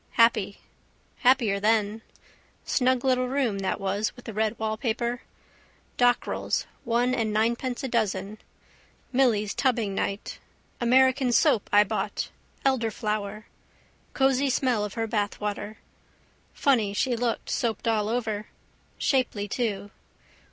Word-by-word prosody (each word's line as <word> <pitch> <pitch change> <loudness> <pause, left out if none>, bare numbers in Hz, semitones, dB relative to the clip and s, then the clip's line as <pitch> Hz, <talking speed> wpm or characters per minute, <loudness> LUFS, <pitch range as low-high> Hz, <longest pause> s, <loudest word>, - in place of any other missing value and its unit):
Happy. 225 -4 +3 0.6
Happier 245 -6 +3
then. 215 +1 +1 0.6
Snug 255 -1 +1
little 255 -1 +2
room 250 -6 0
that 190 +1 -1
was 200 +2 -1
with 245 - -14
the 225 - -6
red 220 +1 0
wallpaper. 235 +2 -2 0.8
Dockrell's, 245 0 +1 0.2
one 240 0 +1
and 225 -4 0
ninepence 235 +4 0
a - - -1
dozen. 215 -3 -1 0.7
Milly's 225 -6 +2
tubbing 235 -7 0
night. 195 +1 -3 0.4
American 260 +1 +4
soap 225 -2 +3
I 205 0 +7
bought: 200 - -3 0.3
elderflower. 215 -4 -1 0.7
Cosy 270 0 +3
smell 250 -4 +1
of 210 -1 -5
her 225 -1 -1
bathwater. 210 -1 -2 0.8
Funny 225 -8 +1
she 250 +3 +1
looked 235 0 -2
soaped 230 -1 -1
all 215 -2 +1
over. 220 -3 -2 0.5
Shapely 240 -6 0
too. 205 -3 -2
225 Hz, 115 wpm, -26 LUFS, 210-250 Hz, 0.8 s, I